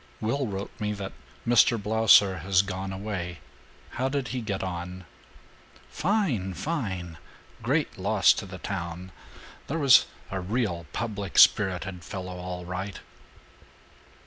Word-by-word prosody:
"Will 130 +4 -1
wrote 100 -1 -5
me 105 -1 -1
that 100 -2 -6 0.3
Mr. 120 0 +5
Blausser 105 -3 +5
has 95 +3 +3
gone 95 0 -4
away. 95 -3 -4 0.6
How 130 - +2
did 135 -2 -2
he 125 -1 -3
get 100 -4 -3
on?" 90 0 -5 0.9
"Fine! 150 - 0
Fine! 95 - -3 0.4
Great - - 0
loss - - +4
to - - -6
the 95 0 -8
town. 90 -1 -5 0.6
There 160 - -2
was 140 -5 +6 0.2
a 95 -1 -2
real 90 -5 -2
public 100 -2 -4
spirited 95 -2 +4
fellow, 90 -2 -6
all 90 0 -6
right!" 90 +2 -5
95 Hz, 125 wpm, -27 LUFS, 90-110 Hz, 0.9 s, was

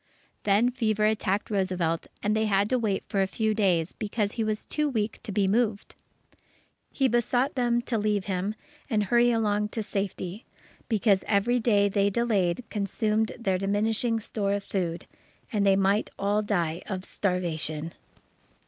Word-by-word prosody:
Then 210 +5 +4
fever 220 -4 +1
attacked 210 -1 0
Roosevelt, 185 -4 0 0.2
and 210 +1 +1
they 220 0 +1
had 200 +1 +2
to 255 - +3
wait 210 -4 -1
for 195 - 0
a 190 - +2
few 220 +2 0
days, 185 -6 +1
because 205 -1 -2
he 225 - -2
was 215 -1 -2
too 300 -1 0
weak 220 -4 -2
to - - -6
be 195 0 +2
moved. 215 0 0 1.0
He 270 - +1
besought 245 +3 +1
them 240 -2 +1
to 235 -3 -1
leave 210 -2 0
him 195 +2 -2 0.3
and 215 -4 +2
hurry 240 +4 +4
along 210 -3 +1
to 220 0 -3
safety, 195 0 -4 0.5
because 205 -3 +3
every 220 +4 +2
day 205 -3 +3
they 200 0 +2
delayed 205 -2 +1
consumed 215 +1 0
their 190 -5 0
diminishing 220 +4 +1
store 205 -2 -2
of 200 0 -2
food, 175 -4 -3 0.5
and 200 -2 +2
they 195 - +6
might 195 +2 +2
all 205 +2 +1
die 175 -5 -1
of 190 -1 -4
starvation. 165 -4 -2
205 Hz, 160 wpm, -27 LUFS, 195-220 Hz, 1.0 s, they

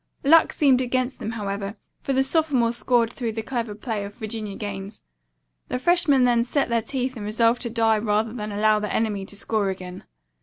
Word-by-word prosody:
Luck 320 +4 +6
seemed 265 -4 +3
against 255 +1 -1
them, 225 - -4
however, 200 -1 -4 0.3
for - - -3
the 265 0 +3
sophomores 270 -6 +1
scored 235 +1 +1
through 235 -4 -3
the 225 0 -4
clever 230 -3 -3
playing 215 -2 -4
of 205 - -13
Virginia 215 -2 -5
Gaines. 200 0 -7 0.6
The - - -2
freshmen 300 -2 +3
then 240 -1 +3
set 270 +2 0
their 230 -1 +1
teeth 255 +2 -3
and 220 - -6
resolved 230 +3 +2
to 235 - -2
die 225 -1 +2
rather 215 +1 0
than 210 -3 -5
allow 215 +1 +3
the 210 -1 -3
enemy 205 -3 -1
to - - -7
score 205 0 0
again. 185 -1 -7
225 Hz, 195 wpm, -24 LUFS, 210-250 Hz, 0.6 s, Luck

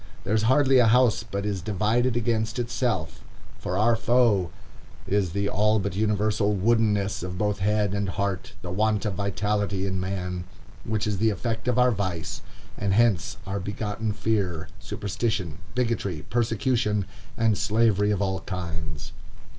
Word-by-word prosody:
There 100 - -1
is 110 - +3
hardly 135 -1 +5
a 120 - +5
house 125 -1 +4
but 100 -2 -4
is 100 -3 -2
divided 110 +6 +1
against 110 -1 0
itself, 120 -8 -2 0.4
for 90 - -2
our 115 +3 +4
foe 115 -6 +3 0.6
is 100 -2 +1
the 100 0 0
all 105 +2 +2
but 100 -2 -2
universal 105 0 +1
woodenness 105 -1 +2
of 90 0 -5
both 105 +1 0
head 105 0 +1
and 100 -1 -1
heart, 95 -2 -2
the 90 - -5
want 105 +2 +1
of 105 - 0
vitality 100 0 -1
in 95 -1 -1
man, 90 -1 -3 0.4
which 110 -1 -1
is 105 -3 -1
the 110 +1 +3
effect 115 +3 -3
of 125 -1 +1
our 125 0 +5
vice; 95 -6 -3 0.4
and 100 -1 +1
hence 115 -5 +2
are 100 +1 -2
begotten 105 +2 -3
fear, 100 -6 -1
superstition, 100 -5 -3 0.2
bigotry, 110 -10 -1
persecution, 115 -3 +1 0.3
and 115 -2 +3
slavery 105 -1 +2
of 100 -1 +1
all 95 -1 -1
kinds. 80 -5 -5
105 Hz, 155 wpm, -26 LUFS, 95-110 Hz, 0.6 s, hardly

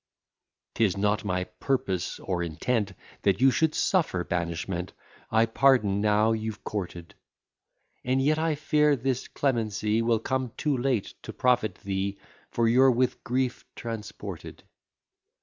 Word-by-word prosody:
'Tis 105 -4 +1
not 105 0 +1
my 90 -3 -1
purpose 95 -1 -2
or 90 -2 -2
intent 100 +5 -1 0.3
That 100 -1 +2
you 135 0 +6
should 160 +3 +1
suffer 160 - +1
banishment; 85 +1 -3 0.4
I 110 +1 +4
pardon, 115 -4 +3
now 105 +1 +3
you've 110 -1 -3
courted; 90 -4 -5 0.9
And 130 +1 +1
yet 150 +3 +2
I 160 -1 +1
fear 150 0 +3
this 130 0 -2
clemency 110 -4 0
Will 115 0 +2
come 130 +1 -2
too 150 -3 +1
late 125 -4 -1
to - - -7
profit 120 -6 +1
thee, 100 0 -2 0.3
For 115 -1 +1
you're 130 +3 +6
with 125 0 +1
grief 130 0 -1
transported. 115 -3 -7
115 Hz, 130 wpm, -27 LUFS, 100-130 Hz, 0.9 s, you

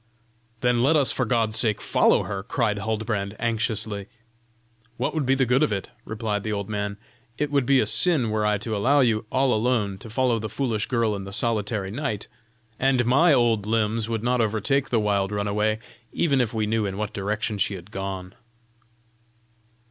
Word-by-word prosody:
"Then 125 -1 +2
let 140 +6 +4
us 135 -6 +3
for 130 - -1
God's 115 -1 +1
sake 110 -3 +1
follow - - +3
her," 100 -1 -4
cried 105 0 -1
Huldbrand, 105 -1 -2
anxiously. 110 -3 -2 0.9
"What - - -1
would 155 -5 -1
be 135 - +4
the 135 -1 +2
good 125 +2 +2
of - - +2
it?" 100 -2 -3
replied 110 -1 -2
the 110 - -4
old 100 -2 -3
man. 100 -1 -3 0.4
"It 150 -1 -1
would 140 -4 +1
be 135 -1 +5
a - - +2
sin 150 -11 +3
were 110 0 0
I 105 0 +2
to 110 +2 -4
allow 135 +8 +3
you, 110 -3 +1
all 130 -1 +2
alone, 110 -4 0
to 115 - -10
follow 120 0 +1
the 110 0 -4
foolish 110 -2 -2
girl 115 -4 +1
in 100 - -5
the 100 - -8
solitary 105 -2 -1
night, 115 -4 -3 0.5
and 130 -2 +2
my 140 +8 +4
old 115 -6 +2
limbs 110 0 0
would 115 -1 -2
not 125 0 +2
overtake 115 +6 0
the 120 - +2
wild 100 -2 0
runaway, 105 +1 0 0.3
even 140 -6 +2
if 115 -3 -1
we 110 -2 -1
knew 110 -1 0
in 95 0 -5
what 105 -1 -3
direction 105 +1 -2
she 100 +1 0
had 90 +2 -11
gone." 95 -2 -5
110 Hz, 190 wpm, -24 LUFS, 105-125 Hz, 0.9 s, be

